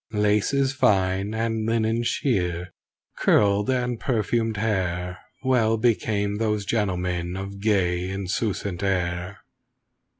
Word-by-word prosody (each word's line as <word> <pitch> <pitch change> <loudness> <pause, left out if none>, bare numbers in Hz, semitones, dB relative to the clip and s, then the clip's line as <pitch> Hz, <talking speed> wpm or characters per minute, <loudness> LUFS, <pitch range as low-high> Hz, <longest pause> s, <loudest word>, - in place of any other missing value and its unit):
(Laces 105 +6 +2
fine 100 -6 +2
and 115 -1 -1
linen 115 0 +1
sheer, 90 -8 -1 0.4
curled 100 +1 +3
and 125 -2 0
perfumed 115 -2 0
hair 90 -4 -1 0.2
Well 115 -4 +3
became 105 -3 +1
those 105 -2 0
gentlemen 90 -4 -1
of 100 +1 -6
gay, 95 -4 +1
insouciant 95 0 -2
air.) 90 -1 -2
105 Hz, 100 wpm, -24 LUFS, 95-115 Hz, 0.4 s, curled